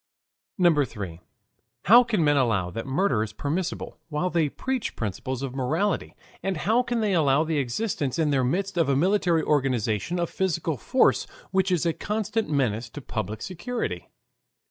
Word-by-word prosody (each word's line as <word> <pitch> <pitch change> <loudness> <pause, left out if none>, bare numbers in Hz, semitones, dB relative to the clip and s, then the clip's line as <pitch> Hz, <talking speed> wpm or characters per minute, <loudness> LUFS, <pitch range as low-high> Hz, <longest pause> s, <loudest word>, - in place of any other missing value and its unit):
3. 95 -8 -7 0.6
How 240 +5 +8
can 215 -8 0
Men 145 -1 +4
Allow 110 -10 +1
that 115 +8 -5
Murder 135 - +1
is 110 - -3
Permissible 170 +5 -3
while 160 +4 -1
they 160 -4 +2
Preach 260 - -3
Principles 120 +5 -4
of 135 -2 -4
Morality, 155 +10 -1 0.3
and 195 -2 -1
How 220 +10 +2
can 240 -2 -1
they 210 -2 +1
Allow 150 -3 +3
of - - -7
the 155 -3 +1
Existence 140 - -2
in 155 -3 +2
their 135 -2 +2
Midst 190 +8 -1
of 160 -4 +2
a 140 - +3
Military 175 0 +2
Organization 130 - 0
of 170 - -1
Physical 170 -4 -1
Force 250 - +2 0.2
which 190 0 +2
is 175 -2 +1
a 165 - +2
Constant 215 0 -2
Menace 120 -6 0
to 145 - -8
Public 110 -5 -4
Security? 185 - -4
155 Hz, 165 wpm, -26 LUFS, 130-190 Hz, 0.6 s, How